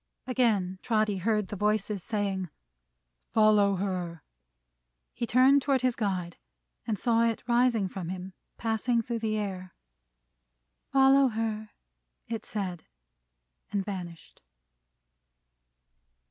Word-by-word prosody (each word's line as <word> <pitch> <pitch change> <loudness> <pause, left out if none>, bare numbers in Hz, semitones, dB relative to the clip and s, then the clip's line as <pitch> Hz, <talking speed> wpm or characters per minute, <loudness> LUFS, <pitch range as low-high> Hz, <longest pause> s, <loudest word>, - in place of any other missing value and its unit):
Again 215 -8 +1
Trotty 215 -3 +1
heard 210 +1 0
the - - -4
voices, 210 0 0
saying, 195 -4 -2 0.8
"Follow 210 -2 +4
her!" 180 -4 -3 0.9
He 235 - -3
turned 265 +4 +5
toward 265 -2 +1
his 255 -2 +2
guide, 185 -5 -2 0.5
and 215 -3 0
saw 230 +2 +2
it 230 -1 -1
rising 240 -4 +3
from 180 -2 -6
him, 185 0 -6 0.2
passing 230 +1 0
through 235 0 -3
the 215 -1 -1
air. 185 -3 -5 1.2
"Follow 270 0 +6
her!" 220 -2 -3 0.6
it 225 -1 -5
said. 185 -5 -4 0.8
And 200 -2 -1
vanished. 180 -5 -7
215 Hz, 105 wpm, -28 LUFS, 190-230 Hz, 1.2 s, Follow